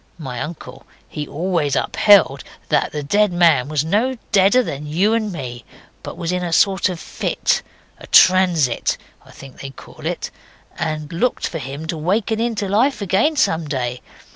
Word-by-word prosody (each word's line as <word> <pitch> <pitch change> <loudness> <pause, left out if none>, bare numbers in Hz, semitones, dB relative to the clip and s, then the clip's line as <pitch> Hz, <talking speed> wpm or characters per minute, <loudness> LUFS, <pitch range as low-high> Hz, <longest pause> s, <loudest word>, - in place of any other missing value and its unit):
My 130 -7 -6
uncle 160 +1 -8 0.2
he 150 -1 -6
always 165 -4 -1
upheld 195 - +4 0.3
that - - +1
that 150 -2 -5
dead 210 +3 +3
man 170 -7 +3
was 150 -1 0
no 230 +9 0
deader 205 +6 +4
than 150 - -6
you 185 +9 +1
and 220 -2 -1
me, 125 -7 -7 0.4
but - - -8
was 170 -1 -3
in 180 0 -2
a 175 - -3
sort 190 +3 +3
of 180 -2 -5
fit, - - -1 0.4
a - - -12
transit, 180 -9 +4 0.3
I - - -20
think 135 -1 -13
they 135 - -6
call 135 - -14
it, - - -4 0.4
and 155 -1 -4
looked 245 +10 0
for 165 - -5
him 140 +3 -7
to 160 0 -4
waken 205 +6 0
into 225 -3 -1
life 235 +8 +1
again 200 - +1
some 165 - +1
day. 125 -3 -3
170 Hz, 170 wpm, -19 LUFS, 150-200 Hz, 0.4 s, upheld